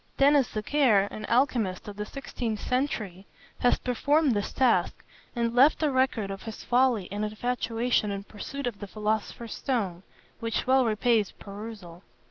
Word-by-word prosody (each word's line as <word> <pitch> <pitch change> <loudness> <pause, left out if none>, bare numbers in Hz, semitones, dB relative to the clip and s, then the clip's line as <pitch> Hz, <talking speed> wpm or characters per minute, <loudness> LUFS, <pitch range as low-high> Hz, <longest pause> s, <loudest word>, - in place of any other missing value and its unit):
Denis 280 -2 +5
Zachaire, 215 -3 +2
an 215 - -6
alchymist 235 -8 +1
of 205 - -7
the 210 +1 -5
sixteenth 235 -5 -4
century, 215 -8 -2 0.3
has 245 - +3
performed 285 +4 +2
this 205 -3 -1
task, 255 -3 +1 0.3
and 235 -1 0
left 275 +6 +5
a 300 - +2
record 260 -6 +1
of 195 - -6
his 225 -2 -8
folly 245 -6 +2
and 205 +1 -2
infatuation 230 +1 0
in 200 0 -4
pursuit 265 +7 -7
of 235 -5 -3
the 205 - -6
philosopher's 215 +2 -3
stone, 200 -10 -2 0.4
which 230 -1 -2
well 260 0 +4
repays 220 -1 +2
perusal. 200 -4 -9
230 Hz, 150 wpm, -27 LUFS, 205-255 Hz, 0.4 s, Denis